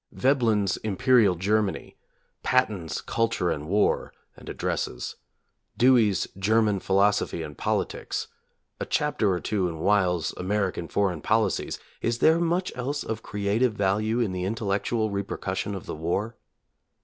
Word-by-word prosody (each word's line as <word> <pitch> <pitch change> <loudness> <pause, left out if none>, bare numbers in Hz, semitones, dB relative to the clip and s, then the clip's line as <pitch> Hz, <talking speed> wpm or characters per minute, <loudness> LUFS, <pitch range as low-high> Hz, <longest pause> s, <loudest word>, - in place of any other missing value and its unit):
Veblen's 115 -8 +2
"Imperial 110 -2 +3
Germany"; 100 +3 -1 0.5
Patten's 100 -11 0
"Culture 115 -6 0
and 75 +1 -4
War," 105 +2 +1 0.2
and - - -12
addresses; 60 -1 -3 0.6
Dewey's 115 -7 +4
"German 105 0 +2
Philosophy 100 -3 +1
and 75 -2 -8
Politics"; - - -2 0.5
a - - -2
chapter 150 -9 +1
or 90 - 0
two 100 -2 -1
in 80 - -6
Weyl's 90 -1 +1
"American 95 -2 -1
Foreign 95 -5 0
Policies"; 110 +1 0 0.2
— - - -33
is 115 0 0
there 160 +6 +4
much 175 +2 0
else 140 +4 -3
of 110 0 -4
creative 105 +4 0
value 105 +4 +1
in 115 -5 +1
the 90 -1 -3
intellectual 110 +2 -1
repercussion 100 0 -3
of 95 - -7
the - - -5
war? 95 +9 -2
105 Hz, 135 wpm, -26 LUFS, 95-115 Hz, 0.6 s, Dewey's